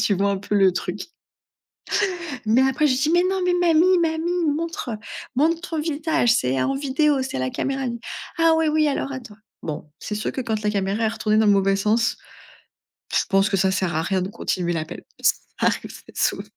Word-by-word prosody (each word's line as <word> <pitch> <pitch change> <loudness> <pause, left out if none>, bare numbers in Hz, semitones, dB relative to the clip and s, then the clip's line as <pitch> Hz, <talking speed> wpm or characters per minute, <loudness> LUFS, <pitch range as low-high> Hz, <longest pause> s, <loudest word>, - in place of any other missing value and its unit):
tu 205 - +2
vois 200 +1 +1
un 200 - -1
peu 205 - -4
le 195 -2 +5
truc? 180 - -4 1.4
Mais 225 +4 +4
après, 265 +3 +2
je 265 - +3
dis: 300 +3 +2
«Mais 350 +1 +5
non, 385 0 0
mais 360 0 +2
mamie 355 +1 +4
mamie, 335 +1 0
montre, 315 -2 -2
heu, - - -4 0.4
montre 325 +4 +2
ton 320 - -2
visage, 310 -4 +1
c'est 130 - +1
en 270 - 0
vidéo, 280 +1 +1
c'est 260 - -4
à - - -2
la 130 0 -1
caméra». 270 - -2
Elle 250 - -1
me - - -5
dit: - - -14 0.4
«Ah 330 0 +5
oui, 320 - +2
oui, 305 0 +3
alors 275 -1 -2
attends». 240 -6 -8 0.3
Bon, 150 -1 -6
c'est 210 - -5
sûr 215 - -2
que, - - -3
quand 220 -3 -2
la 210 - +1
caméra 200 +2 -1
est - - +3
retournée 215 -1 0
dans 220 - +4
le 205 - +6
mauvais 195 0 +3
sens, 215 +3 +1 1.0
je - - +2
pense 195 0 +3
que 195 - +2
ça 190 +1 +2
sert 185 -3 -1
à 160 - +1
rien 185 +2 0
de 185 - -3
continuer 180 -3 -2
l'appel. 160 -2 -5 0.2
Ça - - +4 0.3
arrive, - - -1
c'est - - -16
souv - - +1
235 Hz, 225 wpm, -23 LUFS, 195-310 Hz, 1.4 s, le